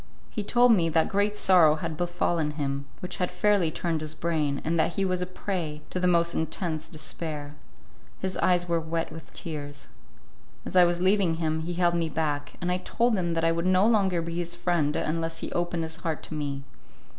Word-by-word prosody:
He 215 - -3
told 240 +3 +5
me 175 -7 +4
that 160 0 +2
great 205 +1 +1
sorrow 175 -7 +5
had 160 0 -4
befallen 175 -2 0
him, 140 -1 -2 0.2
which 180 - -5
had 180 - 0
fairly 190 -1 +2
turned 165 0 -2
his 155 0 -4
brain, 155 -4 0
and 165 +1 +1
that 165 - +1
he 195 - +1
was 185 -1 0
a 180 - -2
prey 175 -5 -4
to 185 - -2
the 180 - +2
most 170 -1 +3
intense 160 -1 -2
despair. 150 -2 -5 0.6
His 190 0 -3
eyes 175 -1 +2
were 170 -1 +1
wet 165 0 -3
with 160 - -10
tears. 145 -4 -7 0.8
As - - -6
I 180 -1 +8
was 175 0 0
leaving 185 -3 +3
him, 160 -1 -1
he 175 - -3
held 175 -1 +3
me 165 -1 0
back, 145 -2 -2
and 180 0 -1
I 180 - +2
told 230 +5 +1
him 170 -3 -1
that 165 - 0
I 165 - +4
would 170 +2 0
no 185 +2 +4
longer 195 -6 +3
be 170 0 -4
his 175 0 -2
friend 170 -4 0
unless 165 +1 -2
he - - -4
opened 175 -1 -1
his 160 0 -3
heart 165 -2 -3
to - - -7
me. 140 -2 -3
170 Hz, 210 wpm, -27 LUFS, 160-180 Hz, 0.8 s, I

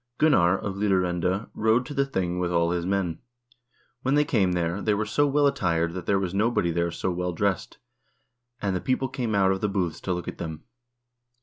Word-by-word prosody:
"Gunnar 95 - +4
of 100 -1 -5
Lidarende 95 0 0
rode 110 +3 +2
to 145 - -7
the 140 -1 +1
thing 90 -8 -2
with 90 -1 -1
all 85 0 +2
his 85 0 -1
men. 95 -4 -1 0.8
When 135 +2 +1
they 150 0 +4
came 100 -10 +2
there, 90 +2 -1
they 105 -2 +1
were 110 +1 -1
so 145 +7 +2
well 145 +1 +3
attired 85 -11 +1
that 90 -2 -6
there 100 - +3
was 95 -2 -2
nobody 100 -4 +1
there 85 +1 0
so 90 +2 -2
well 90 0 -2
dressed, 95 +1 -1 0.8
and 100 -2 -1
the 90 - -2
people 130 0 0
came 120 -4 -2
out 95 -1 +4
of 95 - -1
the 105 - +1
booths 90 -5 -2
to 95 - -3
look 90 0 -5
at - - -6
them. 80 -2 -6
95 Hz, 210 wpm, -26 LUFS, 85-110 Hz, 0.8 s, Gunnar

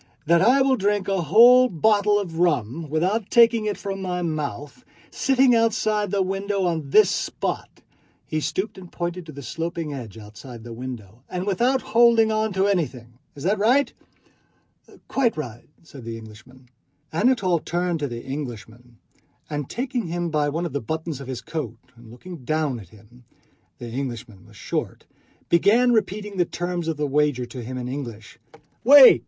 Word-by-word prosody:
that 170 +1 +4
I 255 +7 +5
will 265 0 +3
drink 205 0 0
a 195 -2 0
whole 245 +8 +7
bottle 205 +3 +3
of 170 -5 -5
rum 150 -2 0
without 185 +8 0
taking 230 -2 +5
it 210 -1 -1
from 195 -1 -5
my 180 -1 -2
mouth, 155 - -4 0.3
sitting 265 -2 +3
outside 215 -2 +1
the 195 0 +1
window 195 +1 -2
on 160 -5 -2
this 210 +5 +5
spot" - - -3 0.6
(he 155 - -2
stooped 190 +6 -3
and 180 -2 -13
pointed 175 0 -4
to - - -8
the 140 -1 -9
sloping 165 +2 -4
ledge 120 -7 -7
outside 110 +2 -11
the 120 0 -8
window) 115 -3 -8
"and 180 +1 -3
without 245 +7 +1
holding 230 0 +4
on 215 0 0
to 190 +1 +2
anything. 130 -11 -2 0.2
Is 140 - -9
that 200 +4 +1
right?" 250 +7 +3 1.1
"Quite 245 -8 +1
right," 120 -5 -7
said 140 -5 -12
the 115 0 -6
Englishman. 115 +4 -14 0.5
Anatole 190 -3 +2
turned 175 +1 -2
to 145 - -1
the 120 -2 -7
Englishman 120 -3 -7 0.5
and 145 -2 -3
taking 245 -4 -3
him 170 0 -3
by 150 -1 +1
one 165 +4 -2
of 165 - -5
the 140 - -2
buttons 160 +2 -4
of 135 - -9
his 130 -2 -5
coat 120 -4 -5 0.2
and 115 -1 -16
looking 175 +10 -10
down 150 -1 -1
at 95 -6 -13
him—the 120 +3 -17
Englishman 120 -6 -6
was - - -17
short—began 225 +8 0
repeating 210 -2 -1
the 175 - +3
terms 175 0 -4
of 160 -2 -2
the 150 - -1
wager 145 -3 +1
to 120 +1 -8
him 130 +2 -6
in 125 -1 -4
English. 120 -5 -7 0.4
"Wait!" 275 +1 +9
165 Hz, 170 wpm, -23 LUFS, 130-205 Hz, 1.1 s, Wait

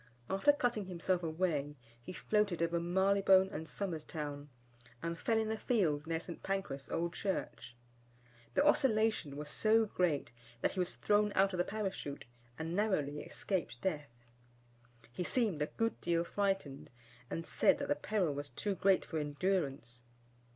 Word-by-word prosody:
After 195 +9 +5
cutting 240 -7 0
himself 180 0 -1
away, 155 -3 -1 0.3
he 120 - -8
floated 200 -3 +1
over 170 0 +1
Marylebone 190 +2 +4
and 160 -1 -6
Somers 175 -6 -3
Town, 145 -2 -5 0.5
and 170 0 -2
fell 225 +7 0
in 220 0 0
a 220 - -2
field 160 -11 +1
near 165 0 0
St. 170 0 -8
Pancras 145 -10 -3
Old 170 0 -1
Church. 190 -10 -3 0.8
The - - +4
oscillation 220 - +2
was 150 0 -5
so 220 +8 +3
great, 175 - 0 0.3
that - - +2
he 190 - -5
was 180 - 0
thrown 210 0 +2
out 195 0 +4
of 180 - -2
the - - +4
Parachute, 195 -9 -4 0.3
and 165 +2 -3
narrowly 150 -9 +1
escaped 175 - -3
death. 150 -6 -2 1.0
He 180 - -3
seemed 210 - 0
a 150 - +1
good 225 +6 -2
deal 170 -1 +1
frightened, 195 -7 -2 0.4
and 165 - -4
said - - +3
that - - -3
the - - +3
peril 175 +1 0
was 145 0 -4
too 205 - -2
great 190 0 +3
for 160 - -3
endurance. 145 -6 -1
180 Hz, 160 wpm, -34 LUFS, 150-200 Hz, 1.0 s, After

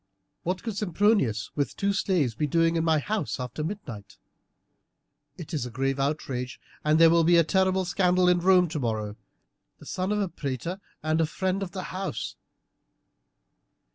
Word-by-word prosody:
"What 180 +1 -2
could 225 -4 -4
Sempronius 195 - +1
with 145 -1 -2
two 200 0 +1
slaves 180 - +1
be 150 +8 -1
doing 165 +2 +2
in 165 - +1
my 160 -1 +3
house 185 0 -2
after 125 +4 -4
midnight? 150 - -7 1.2
It 170 -1 -9
is 150 - -1
a 125 - -5
grave 135 +3 -1
outrage, 135 -3 -2 0.2
and 150 +1 +3
there 165 0 +7
will 170 0 +4
be 170 +1 +5
a 170 - +6
terrible 190 +2 +2
scandal 180 0 +2
in 180 0 +4
Rome 180 0 +5
tomorrow 110 -9 -2 0.6
the - - -15
son 185 +2 -2
of 210 - +1
a 200 - +1
praetor 165 - -4 0.2
and 155 +1 +1
a 160 - +2
friend 190 +4 -1
of 185 -3 -5
the 185 -2 -4
house!" 190 +1 -4
165 Hz, 170 wpm, -27 LUFS, 140-185 Hz, 1.2 s, there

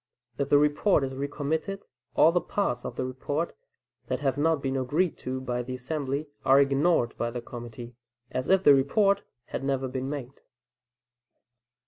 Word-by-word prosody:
If 140 0 0
the 145 - +6
report 150 +3 +3
is 135 0 -3
recommitted, 150 +8 -3 0.3
all 160 - +6
the 175 +1 +2
parts 125 -12 -1
of - - -5
the 130 - -2
report 145 +6 -3 0.5
that - - -1
have 135 -2 +1
not 160 +2 +2
been 135 -1 -2
agreed 145 +7 +1
to 130 0 -3
by 125 -1 -2
the 130 +1 -5
assembly, 140 +2 -3 0.2
are 135 +1 +6
ignored 140 -1 +2
by 120 - 0
the 120 +1 -4
committee 120 0 -9 0.4
as 130 - -2
if 190 0 +4
the 145 - +8
report 195 +10 +3 0.2
had - - -5
never 135 -1 0
been 130 +1 -3
made. 140 -2 -6
140 Hz, 165 wpm, -27 LUFS, 130-155 Hz, 0.5 s, the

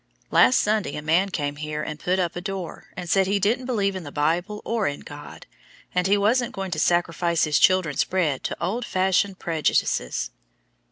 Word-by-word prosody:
Last 125 +1 +5
Sunday 210 -8 0
a - - -4
man 170 +5 +2
came 145 -5 -3
here 150 0 -4
and 155 0 -6
put 185 +1 0
up 175 -2 -1
a 175 - -4
door, 190 -3 -6
and 180 -1 -5
said 190 +2 +3
he 200 +1 +2
didn't 225 +6 0
believe 200 -6 0
in 185 - -4
the 145 - -8
Bible 175 +8 0
or 225 -3 0
in 145 - -4
a - - -14
God, 145 0 -10 0.5
and 180 +1 +1
he 200 +1 +4
wasn't 235 +4 +1
going 195 -1 -4
to - - -2
sacrifice 170 -2 +1
his 150 -2 +2
children's 185 -6 +3
bread 160 -8 -1
to - - -3
old 225 +7 -2
fashioned 190 -1 +1
prejudices. 155 - 0
180 Hz, 200 wpm, -24 LUFS, 155-195 Hz, 0.5 s, Last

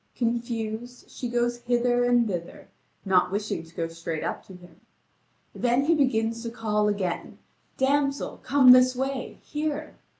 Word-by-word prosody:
Confused, 235 0 -3
she 245 - -5
goes 240 0 0
hither 245 0 +1
and 245 -1 +3
thither, 175 -4 -6 0.4
not 185 -2 +3
wishing 205 -3 -2
to 165 0 -18
go 165 - -2
straight 165 -1 -5
up - - -3
to 190 - -11
him. 175 -2 -17 0.7
Then 245 +3 +1
he 330 - +4
begins 230 -6 +1
to 230 - -4
call 215 -2 0
again: 195 -4 -2 0.4
"Damsel, 275 +1 0
come 260 -1 +6
this 255 0 +6
way, 265 0 -3
here!" 305 0 -3
240 Hz, 145 wpm, -26 LUFS, 210-255 Hz, 0.7 s, come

